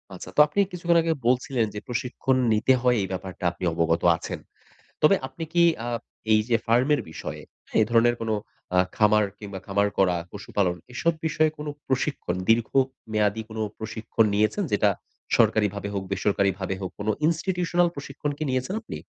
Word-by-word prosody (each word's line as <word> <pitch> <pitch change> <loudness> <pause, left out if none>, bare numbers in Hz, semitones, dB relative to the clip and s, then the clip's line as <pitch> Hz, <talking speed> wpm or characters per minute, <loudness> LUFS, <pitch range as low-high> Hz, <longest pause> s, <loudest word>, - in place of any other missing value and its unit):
আচ্ছা - - -9
তো - - +4
আপনি 150 - -2
কিছুক্ষণ 175 -1 +2
আগে 165 0 +1
বলছিলেন 125 -1 +2
যে 105 - -4
প্রশিক্ষণ 125 +2 -1 0.2
নিতে 110 +5 +4
হয় 125 -1 +3
এই 95 - -2
ব্যাপারটা 95 0 -6
আপনি 90 - -11
অবগত 85 0 +1 0.2
আছেন। - - -6 0.6
তবে 155 +6 +6
আপনি 165 - -7
কি 170 -1 +5 0.2
আ - - -3 0.4
এই 110 - +6
যে 115 - +4
ফার্মের 130 +6 +3
বিষয়ে - - -6 0.4
এ - - +6
ধরনের 120 +1 +4
কোন 115 - -2 0.5
আ - - +5 0.2
খামার 105 0 +4
কিংবা 100 -2 -7
খামার 100 +1 +1
করা, 90 -2 +3 0.2
পশুপালন 100 -2 -1 0.2
এসব 170 +6 +1
বিষয়ে 155 0 +2
কোন 150 0 -6 0.2
প্রশিক্ষণ 130 -8 -1
দীর্ঘ 115 0 +4 0.4
মেয়াদী 105 0 +1
কোন 110 - -8 0.2
প্রশিক্ষণ 110 0 0
নিয়েছেন? 110 - +1
যেটা 105 0 +3 0.5
সরকারিভাবে 105 -1 +2
হোক, 100 - -2
বেসরকারিভাবে 95 -1 0
হোক, 95 - -4
কোন 105 - -5 0.2
Institutional 175 +1 +1
প্রশিক্ষণ 140 +1 -4
কি 155 - -3
নিয়েছেন 130 +7 -1
আপনি? - - -7
115 Hz, 165 wpm, -25 LUFS, 100-145 Hz, 0.6 s, তবে